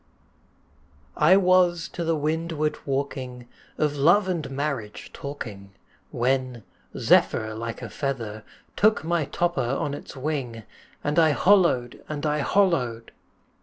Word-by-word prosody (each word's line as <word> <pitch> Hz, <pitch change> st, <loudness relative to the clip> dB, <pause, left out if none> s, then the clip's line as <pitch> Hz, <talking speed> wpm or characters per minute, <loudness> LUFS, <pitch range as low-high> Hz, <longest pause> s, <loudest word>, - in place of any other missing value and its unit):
] 70 Hz, -1 st, -34 dB, 0.2 s
I 190 Hz, -, +8 dB
WAS 180 Hz, -2 st, +3 dB
to 175 Hz, -, -5 dB
the 165 Hz, 0 st, +1 dB
windward 155 Hz, 0 st, -1 dB
walking, 130 Hz, -3 st, -3 dB, 0.3 s
Of 150 Hz, -1 st, 0 dB
love 175 Hz, +8 st, +4 dB
and 170 Hz, -7 st, -2 dB
marriage 135 Hz, -6 st, -4 dB
talking, 105 Hz, -9 st, -8 dB, 0.4 s
When, 130 Hz, -1 st, -1 dB, 0.3 s
zephyr 110 Hz, 0 st, +3 dB
like 115 Hz, +1 st, -6 dB
a -, -, -6 dB
feather, 115 Hz, -7 st, -4 dB, 0.3 s
Took 215 Hz, -3 st, +3 dB
my 165 Hz, -1 st, 0 dB
topper 175 Hz, +4 st, -1 dB
on 135 Hz, +3 st, -1 dB
its 145 Hz, -, -8 dB
wing 130 Hz, -5 st, -3 dB, 0.4 s
And 150 Hz, +2 st, +1 dB
I 160 Hz, -2 st, +5 dB
hollo'd! 170 Hz, -11 st, +3 dB
and 150 Hz, 0 st, -4 dB
I 150 Hz, 0 st, +1 dB
hollo'd! 135 Hz, -, +1 dB
140 Hz, 130 wpm, -25 LUFS, 120-165 Hz, 0.4 s, I